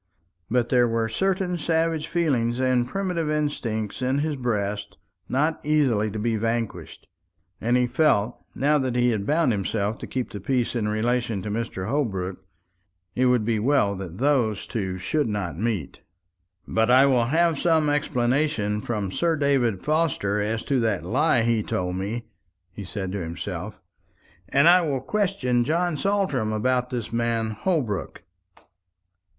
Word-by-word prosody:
But 120 0 +1
there 125 -2 +4
were 115 -1 0
certain 180 - -1
savage 160 0 0
feelings 130 -8 0
and 130 -2 +2
primitive 180 -1 -2
instincts 125 -9 -2
in 130 +2 +1
his 150 +1 -1
breast 105 -5 -2 0.3
not 150 +5 0
easily 135 -9 +2
to 105 - -5
be 110 +1 0
vanquished; 115 0 -3 0.6
and 120 +2 +2
he 125 - +3
felt 125 -5 +1
that 145 +1 +2
now 130 - -1
he 120 0 +3
had 105 -3 -2
bound 155 -2 +3
himself 105 +1 -1
to - - -7
keep 130 -2 -3
the 100 - -6
peace 125 +4 -1
in 110 -3 0
relation 110 -1 0
to 105 - -4
Mr. 105 -4 -3
Holbrook, 95 -9 -2 0.7
it 130 +1 +2
would 125 -4 +2
be 115 -1 +1
well 125 -3 +2
that 95 -3 -7
those 125 -6 +1
two 95 -5 -3
should 120 +10 0
not 95 -5 -3
meet. 105 - -2 0.7
"But 110 +1 +1
I 130 +2 +7
will 125 -4 +3
have 160 +3 +2
some 160 -3 +3
explanation 130 -6 0
from 105 -5 -3
Sir 165 - +1
David 135 -9 +1
Forster 150 -10 +1
as 110 +2 -2
to 135 -2 +1
that 110 -7 0
lie 130 - +2
he 115 -1 +2
told 90 -3 -2
me," 105 +5 -3 0.5
he 100 - -8
said 95 0 -5
to 100 0 -3
himself; 85 +1 -5 0.7
"and 140 +7 +4
I 180 +1 +7
will 145 -5 -1
question 135 -8 0
John 170 +5 0
Saltram 150 - 0
about 125 +3 0
this 120 -3 -4
man 115 -1 0
Holbrook." 115 - -2
120 Hz, 155 wpm, -24 LUFS, 105-145 Hz, 0.7 s, I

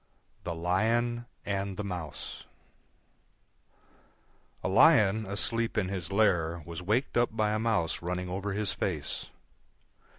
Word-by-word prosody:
THE 85 -1 -2
LION 115 +8 +1 0.2
AND 100 -1 -2
THE 105 - -2
MOUSE 90 -6 -6 2.2
A - - 0
Lion 105 +1 +5
asleep 115 +3 -1
in 95 -4 +1
his 95 -3 -4
lair 85 -6 +2
was 85 +1 -6
waked 110 +10 0
up 120 -2 +1
by 105 -1 +2
a 110 - 0
Mouse 110 -8 0
running 90 +1 -2
over 95 +3 -3
his 105 0 -1
face. 80 -7 -3
100 Hz, 125 wpm, -30 LUFS, 90-110 Hz, 2.2 s, Lion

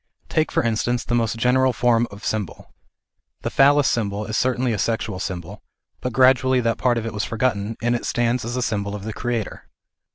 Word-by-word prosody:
Take 155 0 +1
for - - +1
instance 115 +1 0
the - - -3
most 115 -1 +1
general 130 +2 +3
form 120 0 +2
of 100 +1 -11
symbol. 105 -6 -4 0.7
The - - -2
Phallas 140 +1 +5
symbol 105 -2 -1
is 110 - -4
certainly 125 -1 +1
a 105 - -3
sexual 110 -2 -1
symbol, 95 +1 -6 0.4
but 125 - -3
gradually 130 +1 +4
that 115 -1 0
part 120 -2 +2
of 115 - -3
it 115 - -4
was 105 -1 -2
f - - -9
orgotteif, 115 -2 -1
and 120 +1 +2
it 120 - -3
stands 120 0 0
as 120 +2 -4
a 125 - 0
symbol 100 -3 -2
of 100 - -7
the 110 +1 -5
Creator. 120 -2 -4
115 Hz, 205 wpm, -22 LUFS, 105-125 Hz, 0.7 s, Phallas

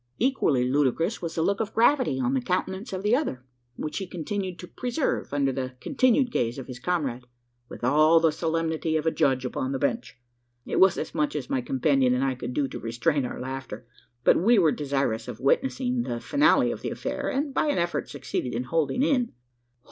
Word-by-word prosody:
Equally 155 - +2
ludicrous 145 - +1
was 165 -2 -4
the 160 - +1
look 200 +3 +1
of 220 -1 -3
gravity 240 - +3
on 125 0 0
the 130 - +1
countenance 190 - -2
of 190 0 -4
the 210 +3 +4
other 130 - -2 0.3
which 150 +6 -4
he 190 - -5
continued 185 +1 -4
to 180 - -9
preserve 250 - -2
under 140 -1 +1
the 130 -1 -4
continued 255 - +2
gaze 120 - -1
of 135 - -6
his 125 -2 -8
comrade, 130 -7 -2 0.4
with - - -10
all 155 +6 +5
the 160 -1 +3
solemnity 160 0 -1
of 155 - -3
a 160 - +3
judge 130 -4 +1
upon 130 +1 -2
the - - 0
bench. 145 - -2 0.5
It - - -1
was 190 -1 +5
as - - -4
much 150 -2 0
as 140 -4 -4
my 130 - +1
companion 130 0 +2
and 130 - 0
I 135 -1 +1
could 125 -1 -6
do 145 -2 +1
to - - -6
restrain 130 +5 0
our - - -6
laughter; 130 -3 -6 0.4
but - - +5
we 230 +5 +5
were 165 -6 +5
desirous 135 -7 -1
of 120 -3 -7
witnessing 250 - +1
the 120 - -3
finale 290 - +3
of - - -6
the - - -3
affair, - - -3
and, 280 +1 -2
by 305 - +1
an 295 - +1
effort, 170 0 -1
succeeded 125 -3 -4
in 120 - -1
holding 160 - 0
in. 250 - +1
155 Hz, 210 wpm, -26 LUFS, 130-195 Hz, 0.5 s, all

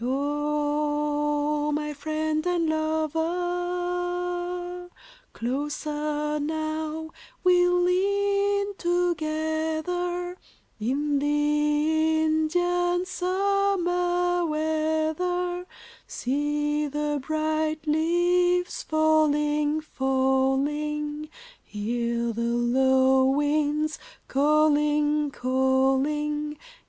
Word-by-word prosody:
O 295 +1 0
my 300 0 -3
friend 310 +1 -2
and 345 -2 +1
lover, 355 +3 -2 0.4
Closer 295 +3 -2
now 315 +1 -3 0.3
we 360 -1 +5
lean 400 +3 +1
together 345 +1 -1 0.4
In 280 +6 0
the 300 +2 +1
Indian 350 +3 +1
summer 360 -2 0
weather; 315 +3 -1 0.4
See 295 +3 -1
the 295 0 -2
bright 310 +1 -1
leaves 350 +3 +1
falling, 300 -1 +2
falling, 290 +2 0 0.3
Hear 235 +2 -2
the 230 - -4
low 260 +3 +3
winds 300 +2 0 0.3
calling, 300 +1 +2
calling. 270 +4 0
310 Hz, 60 wpm, -26 LUFS, 295-350 Hz, 0.4 s, we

